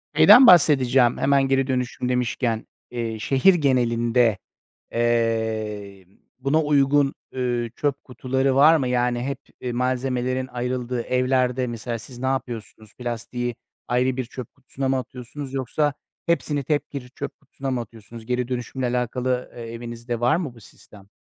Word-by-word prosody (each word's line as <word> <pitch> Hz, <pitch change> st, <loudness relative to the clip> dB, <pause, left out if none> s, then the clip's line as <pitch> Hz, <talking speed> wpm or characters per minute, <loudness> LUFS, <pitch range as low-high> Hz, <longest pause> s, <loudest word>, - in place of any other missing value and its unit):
şeyden 250 Hz, 0 st, +9 dB
bahsedeceğim 130 Hz, -7 st, +5 dB
hemen 140 Hz, 0 st, +3 dB
geri 135 Hz, 0 st, +2 dB
dönüşüm 125 Hz, -1 st, -2 dB
demişken, 120 Hz, -2 st, -1 dB, 0.2 s
eee, 115 Hz, -2 st, -3 dB
şehir 135 Hz, -, +4 dB
genelinde, 120 Hz, -, +2 dB, 0.6 s
eee, 110 Hz, -4 st, -1 dB, 0.3 s
buna 140 Hz, +4 st, +2 dB
uygun, 145 Hz, -1 st, +3 dB, 0.2 s
üüü, 120 Hz, -3 st, -2 dB
çöp 145 Hz, -2 st, -1 dB
kutuları 130 Hz, +1 st, -1 dB
var 150 Hz, +4 st, +7 dB
mı? 135 Hz, -4 st, -1 dB
Yani 125 Hz, -1 st, +1 dB
hep, 140 Hz, +1 st, -3 dB, 0.2 s
eee, 125 Hz, -1 st, -3 dB
malzemelerin 130 Hz, +1 st, -1 dB
ayrıldığı 125 Hz, 0 st, -3 dB
evlerde 125 Hz, 0 st, +1 dB
mesela 115 Hz, 0 st, -4 dB
siz 120 Hz, +2 st, -10 dB
napıyorsunuz? 120 Hz, -4 st, -4 dB
Plastiği 120 Hz, 0 st, -4 dB, 0.3 s
ayrı 125 Hz, +1 st, +1 dB
bir 130 Hz, -, -2 dB
çöp 125 Hz, 0 st, -9 dB
kutusuna 135 Hz, 0 st, -5 dB
mı 135 Hz, -, +2 dB
atıyorsunuz 130 Hz, +3 st, -7 dB
yoksa 135 Hz, +3 st, 0 dB, 0.3 s
hepsini 150 Hz, -4 st, 0 dB
tek 145 Hz, +2 st, -1 dB
bir 130 Hz, -3 st, -6 dB
çöp -, -, -7 dB
kutusuna 135 Hz, -2 st, -6 dB
mı 125 Hz, -2 st, -1 dB
atıyorsunuz? 115 Hz, 0 st, -12 dB
Geri 125 Hz, 0 st, -1 dB
dönüşümle 125 Hz, +1 st, -3 dB
alakalı, 125 Hz, +1 st, -1 dB
eee, 120 Hz, -, -8 dB
evinizde 120 Hz, 0 st, -5 dB
var 120 Hz, +5 st, +3 dB
mı 160 Hz, -7 st, -3 dB
bu 115 Hz, -, -15 dB
sistem? 100 Hz, -1 st, -16 dB
125 Hz, 140 wpm, -23 LUFS, 120-135 Hz, 0.6 s, şeyden